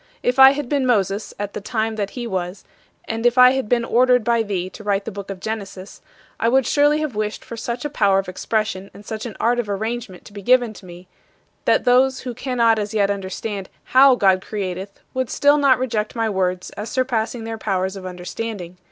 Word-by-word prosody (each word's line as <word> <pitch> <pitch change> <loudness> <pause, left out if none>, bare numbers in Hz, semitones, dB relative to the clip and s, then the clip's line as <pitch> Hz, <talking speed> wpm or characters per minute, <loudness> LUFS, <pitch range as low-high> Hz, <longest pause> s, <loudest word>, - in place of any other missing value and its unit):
if 250 +2 +1
I 265 +1 +10
had 290 -2 -4
been 275 -1 0
Moses 200 -3 0
at 205 0 -4
the - - -5
time 220 +1 -2
that 205 -2 -2
he 240 - -3
was, 185 -3 -4 0.4
and 225 0 -4
if 240 +1 +3
I 250 0 +8
had 265 -5 -2
been 235 -1 +2
ordered 250 0 +3
by 235 0 +2
thee 195 -4 -2
to 200 +3 -11
write 200 -1 0
the 225 - -4
book 200 -1 -8
of 195 -2 -6
Genesis, 200 -2 -6 0.4
I 230 - +2
would 265 +1 +3
surely 295 +1 +3
have 305 -5 -2
wished 210 0 -3
for 235 - -7
such 235 +3 -4
a - - +2
power 200 -9 +2
of 195 -1 -1
expression 200 +1 -2
and 205 - -13
such 220 +2 -5
an 220 - -9
art 240 +2 +2
of 225 -4 -3
arrangement 215 -1 -4
to - - -14
be 205 - -8
given 245 +1 +3
me, 180 -1 -12 0.6
that - - +3
those 255 +1 +3
who 250 -2 -5
cannot 235 -3 +1
as 210 +1 -4
yet 200 -1 +2
understand 195 0 -5
how 265 0 +6
God 190 -5 +3
createth 195 -1 -5
would 260 -2 -2
still 290 +1 +3
not 275 -3 +5
reject 225 -4 -2
my 225 -1 0
words 185 -2 -1
as 210 +2 -6
surpassing 245 -2 -1
their 225 0 -5
powers 190 -2 -1
of 195 - -8
understanding. 180 0 -6
220 Hz, 215 wpm, -21 LUFS, 195-245 Hz, 0.6 s, I